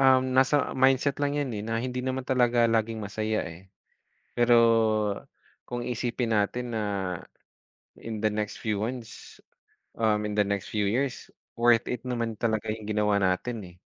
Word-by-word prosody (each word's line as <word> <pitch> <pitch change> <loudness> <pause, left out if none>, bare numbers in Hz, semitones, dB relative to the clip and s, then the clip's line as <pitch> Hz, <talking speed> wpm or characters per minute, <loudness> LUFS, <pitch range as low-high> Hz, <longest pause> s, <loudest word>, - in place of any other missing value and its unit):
um, 130 -1 +4
nasa 135 +2 +3
mindset 135 +2 +3
lang 145 0 0
yan, 140 -4 -2
eh, 105 - -4
na 115 +1 -2
hindi 125 +1 -3
naman 130 0 -2
talaga 120 -2 +3
laging 115 -1 0
masaya, 110 +1 -2
eh. 85 +3 -11 0.7
Pero, 120 0 +5 1.1
kung 120 0 -4
iisipin 120 0 -2
natin 120 +3 -1
na 110 - 0 1.2
in 110 -2 -6
the 110 - +4
next 105 0 -3
few 105 -2 -1
months, 115 +1 -6 0.6
um, 110 -2 +2
in 105 - -4
the 105 - +4
next 100 -1 -2
few 105 -2 0
years, 125 +6 -1 0.3
worth 120 -1 +4
it 125 -2 -3
naman 115 -3 -2
talaga 110 -1 -1
yung 110 -1 -4
ginawa 105 -1 +1
natin, 100 +5 0 0.2
eh. - - -22
115 Hz, 160 wpm, -27 LUFS, 105-125 Hz, 1.2 s, Pero